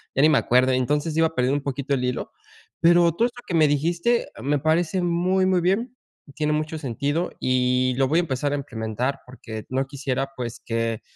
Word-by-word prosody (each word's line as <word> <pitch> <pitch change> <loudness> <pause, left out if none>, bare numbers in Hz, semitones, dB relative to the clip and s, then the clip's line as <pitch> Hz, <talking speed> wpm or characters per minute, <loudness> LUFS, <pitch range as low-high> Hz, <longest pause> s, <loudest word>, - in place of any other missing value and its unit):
ya 135 - +3
ni 155 - +6
me 150 - +4
acuerdo. 130 +2 +3
Entonces 145 +5 0
iba 160 - +4
a 160 - -12
perder 125 +1 +1
un 145 0 -1
poquito 140 0 -2
el 125 -1 -1
hilo, 125 -1 -3 0.5
pero 170 0 +5
todo 225 +8 +2
esto 245 0 -5
que 175 - -3
me 155 -2 +5
dijiste 170 +11 +1
me 145 +2 +1
parece 165 +4 +1
muy, 180 +2 +1
muy 185 -1 +3
bien. 230 +8 0 0.4
Tiene 150 0 0
mucho 155 +1 -2
sentido 145 +4 -2
y 125 0 +1
lo 135 -1 +3
voy 160 +5 +2
a - - +4
empezar 145 -2 -2
a - - +1
implementar 120 0 -3
porque 110 -4 -9
no 135 +1 -1
quisiera 135 -1 -3
pues 120 -2 -5
que 115 -1 -2
145 Hz, 205 wpm, -24 LUFS, 130-170 Hz, 0.5 s, ni